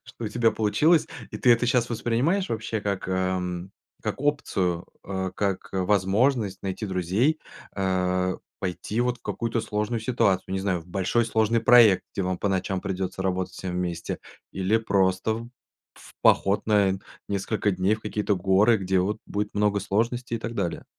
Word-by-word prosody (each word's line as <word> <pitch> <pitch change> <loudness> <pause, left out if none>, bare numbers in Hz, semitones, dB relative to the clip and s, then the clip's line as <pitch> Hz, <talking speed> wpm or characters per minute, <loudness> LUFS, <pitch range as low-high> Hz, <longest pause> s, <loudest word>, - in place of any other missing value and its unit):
что 115 - -9
у - - -1
тебя 115 0 +2
получилось, 150 +11 +3 0.2
и - - -5
ты 125 - +4
это 120 +1 +2
щас 120 -1 +2
воспринимаешь 120 - 0
вообще 110 -1 -2
как, 100 -2 -3
эм, 95 0 -2 0.3
как - - -3
опцию, 95 - 0 0.2
э, 95 -1 -3
как 100 -2 -2
возможность 100 +3 +1
найти 95 +2 -3
друзей, 95 - +1 0.4
э, 95 -1 0 0.2
пойти 100 +4 -2
вот 125 0 0
в - - -37
какую-то 115 0 -2
сложную 105 +2 -2
ситуацию, 100 -6 +1
не 95 - 0
знаю, 95 -3 0
в 80 - -16
большой 100 +6 +1
сложный 110 +1 +2
проект, 120 -5 +6
где 100 - -2
вам 90 -1 -1
по 100 - 0
ночам 95 0 -1
придется 95 0 -3
работать 95 -1 -1
всем 95 - -5
вместе, 85 -2 -3 0.3
или 95 +3 +1
просто 95 -1 +1
в 115 +1 -7 0.5
в - - -16
поход 100 +1 +4
на 100 -3 +3 0.3
несколько 100 +1 0
дней 95 +4 +1
в - - -16
какие-то 105 -1 -1
горы, 100 +5 +4
где 95 -1 +1
вот 105 +4 -1
будет 105 0 -3
много 105 0 +2
сложностей 115 +5 -1
и 115 - -8
так 115 +1 -5
далее? 90 -5 -2
100 Hz, 170 wpm, -25 LUFS, 95-115 Hz, 0.5 s, проект